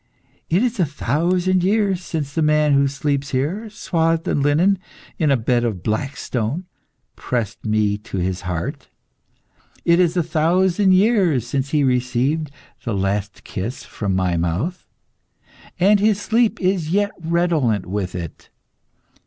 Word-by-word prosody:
It 180 +7 +3
is 245 -3 -1
a 175 - +4
thousand 175 +7 +1
years 195 -2 +1
since 150 -4 -4
the 165 - 0
man 150 -1 +3
who 140 0 +4
sleeps 140 0 -2
here, 170 - -2
swathed 165 -5 0
in 145 - +1
linen, 170 +7 +3 0.4
in 155 -3 +2
a 135 - +4
bed 120 +1 +1
of 105 -7 -2
black 130 +6 -2
stone, 130 - -3 0.5
pressed 120 -5 -3
me 105 -1 +1
to 105 -2 -7
his 90 0 -1
heart. 90 - -4 1.0
It 170 +1 +4
is 180 0 +2
a 175 - +3
thousand 180 +4 +2
years 185 - +3
since 135 +2 -2
he 150 0 +2
received 130 +4 0 0.3
the 115 -4 -2
last 100 +1 -2
kiss 110 +8 -5
from 100 -3 -3
my 90 -2 +1
mouth, 90 - -2 0.9
and 200 +3 +5
his 210 0 +2
sleep 225 +2 +1
is 180 -4 0
yet 205 +3 +1
redolent 160 - +1
with 95 -1 -3
it. 85 -3 -7
150 Hz, 145 wpm, -21 LUFS, 115-180 Hz, 1.0 s, and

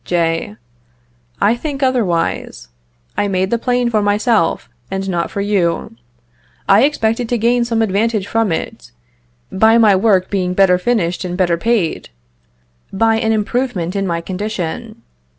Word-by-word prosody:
J. 165 -10 -1 0.8
I 210 +4 +3
think 280 +2 -4
otherwise. 190 - -1 0.5
I 205 - 0
made 190 -1 -1
the 235 - +1
plane 245 0 0
for 215 -2 +2
myself, 205 -3 +1 0.2
and 195 0 -3
not 175 -3 -1
for 200 - -4
you. 185 - -1 0.7
I 200 +6 +5
expected 230 -4 -1
to 245 - +1
gain 235 +2 +2
some 230 -1 0
advantage 215 0 0
from 225 -2 0
it, 195 - -5 0.6
by 220 +4 +4
my 215 -4 +5
work 190 -2 +2
being 180 -2 -1
better 180 -2 +4
finished 180 -5 -1
and 180 -1 -4
better 175 -3 +2
paid, 200 -3 -1 0.8
by 225 +3 +2
an 225 0 0
improvement 215 -4 -1
in 195 -1 -1
my 170 -1 -2
condition. 185 -1 -5
205 Hz, 145 wpm, -17 LUFS, 180-230 Hz, 0.8 s, I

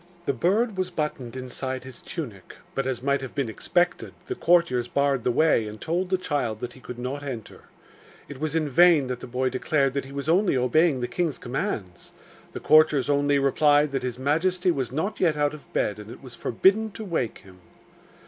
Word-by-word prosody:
The 140 - +1
bird 200 - +1
was 185 -1 0
buttoned 150 -8 -4
inside 130 0 -4
his 130 -2 -11
tunic, 115 - -7 0.2
but, 135 -1 -1
as 130 -2 -3
might 140 0 +1
have 130 - -8
been 135 -5 -1
expected, 175 - -1
the 385 - -3
courtiers 170 - +2
barred 140 -1 +1
the - - +1
way, 125 -4 +3
and 105 0 -8
told 175 - -1
the 185 - +2
child 140 -11 -2
that 120 +1 -5
he - - -15
could 125 -1 -9
not 130 +4 -4
enter. 130 -6 -7 0.6
It 140 - -9
was 155 +1 -2
in 155 -2 +1
vain 165 0 +5
that 125 -1 -3
the - - -8
boy 130 +1 0
declared 135 +1 0
that 140 -1 -2
he 135 - -11
was 140 0 -5
only 175 -2 +3
obeying 130 +3 +2
the 125 - -1
king's 170 -1 -1
commands; 120 - -4 0.4
the - - -5
courtiers 150 -3 +4
only 145 0 +2
replied 145 +1 +3
that 135 - -1
his 125 -1 -4
majesty 175 +7 +1
was 130 -7 -2
not 190 +10 -2
yet 165 -5 +2
out 145 0 +1
of 150 - -12
bed, 105 0 -1
and 105 0 -10
it 120 - -11
was 130 -2 -11
forbidden 200 - +2
to 220 - -7
wake 160 - -2
him. 95 -1 -16
140 Hz, 205 wpm, -25 LUFS, 125-165 Hz, 0.6 s, vain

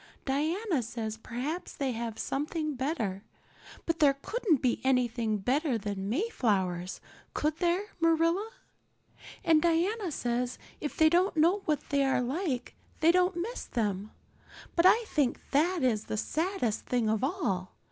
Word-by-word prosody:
"Diana 315 - 0
says 225 -1 -4
perhaps 255 +10 -5
they 275 -2 -1
have 230 -1 -4
something 305 +2 -2
better, 245 - -2 0.6
but 330 -1 -1
there 285 -3 +5
couldn't 365 - 0
be 245 -2 0
anything 240 -4 +1
better 260 - +1
than 200 -2 -4
Mayflowers, 200 - 0 0.3
could 305 +1 0
there, 350 +2 +1 0.2
Marilla? 330 +5 +2 0.9
And 320 -2 +5
Diana 350 +4 +1
says 245 -2 -1 0.2
if 295 - -4
they 315 - +6
don't 350 +2 +3
know 340 +6 +4
what 300 -3 -1
they 280 -1 +3
are 270 -1 +2
like 265 -1 -2 0.3
they 320 +1 +6
don't 360 0 +2
miss 405 +8 -4
them. 210 -3 -2 0.7
But 340 +2 +6
I 455 +5 +5
think 290 - 0
that 330 +3 +2
is 220 -4 +1
the 215 - -3
saddest 315 - -1
thing 245 -3 +1
of 220 +1 +1
all. 230 - -1
285 Hz, 145 wpm, -30 LUFS, 235-340 Hz, 0.9 s, they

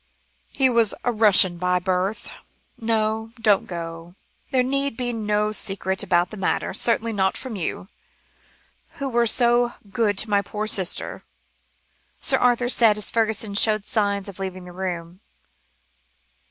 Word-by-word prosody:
"He 270 - +2
was 235 -4 +2
a 245 - +1
Russian 200 -5 +4
by 180 0 +1
birth 185 +3 -2 0.5
no, 220 0 -2
don't 210 -3 +2
go, 165 0 -8 0.3
there 260 -2 +2
need 275 -1 -2
be 245 -1 -2
no 210 -1 -1
secret 190 -2 -2
about 180 -3 +1
the 215 - -8
matter, - - -1
certainly 230 -1 +2
not 190 -2 0
from 255 -4 -7
you, 185 0 -4 1.1
who 275 - -5
were 235 -2 +1
so 240 +1 +3 0.2
good 210 -3 0
to 215 - +3
my 200 0 +3
poor 210 +2 -5
sister," 195 -4 0 1.0
Sir - - +3
Arthur 245 0 +2
said, 230 -4 +4
as 210 - -1
Fergusson 220 -2 0
showed 215 0 +3
signs 200 -2 -1
of 195 -1 -9
leaving 185 -1 -5
the 180 - -11
room. 175 -1 -6
210 Hz, 145 wpm, -22 LUFS, 190-230 Hz, 1.1 s, Russian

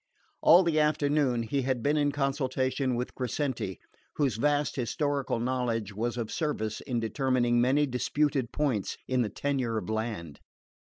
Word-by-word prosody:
All 175 +4 +7
the 165 -3 +2
afternoon 145 -5 +2
he 135 +5 -1
had 130 -2 -1
been 145 +1 +2
in 145 -1 +2
consultation 135 -2 0
with 125 +1 -3
Crescenti, 125 - -3 0.4
whose 135 -8 +1
vast 145 +3 +1
historical 140 0 -1
knowledge 120 -4 -1
was 120 +4 -2
of 115 -3 -3
service 110 -9 -2
in 120 -2 -2
determining 120 0 +1
many 135 +4 +3
disputed 135 0 0
points 135 -10 -1
in 130 -1 +1
the 110 - 0
tenure 130 -2 -1
of 110 - -3
land. 110 -9 -4
130 Hz, 150 wpm, -29 LUFS, 115-145 Hz, 0.4 s, All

